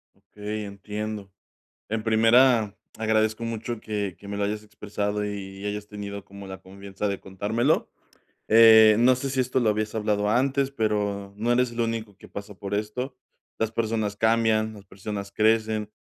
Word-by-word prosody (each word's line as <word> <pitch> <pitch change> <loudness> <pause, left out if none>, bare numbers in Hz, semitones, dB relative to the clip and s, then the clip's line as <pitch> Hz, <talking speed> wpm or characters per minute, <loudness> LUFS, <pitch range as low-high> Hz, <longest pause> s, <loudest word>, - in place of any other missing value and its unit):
Okey, 105 +1 -6
entiendo. 105 0 -6 0.6
En 110 0 -2
primera, 115 -1 +4 0.2
agradezco 110 +1 +1
mucho 115 0 -4
que 105 -4 -3
que 100 - -12
me 100 - -4
lo 100 - 0
hayas 105 +1 -2
expresado 105 0 -3
y 95 -1 -6
y 100 - -5
hayas 105 0 -4
tenido 100 -1 -7
como 100 0 -11
la 95 0 -7
confianza 100 +1 -5
de 100 -1 -3
contármelo, 110 +9 0 0.6
eh, 110 -1 +8
no 125 +2 +6
sé 135 +2 -3
si 130 0 0
esto 130 +1 +1
lo 115 -3 +3
habías 105 0 -2
hablado 105 -1 0
antes, 135 +4 +2
pero 105 -5 -1
no 115 +3 +1
eres 125 0 +2
el 120 - -4
único 115 -3 -2
que - - -15
pasa 100 0 -8
por 100 +1 -5
esto. 125 +5 -3 0.4
Las 110 0 -1
personas 110 -3 -1
cambian, 110 0 +2
las 100 -1 -13
personas 100 +1 -6
crecen, 110 0 +1
105 Hz, 170 wpm, -25 LUFS, 100-115 Hz, 0.6 s, eh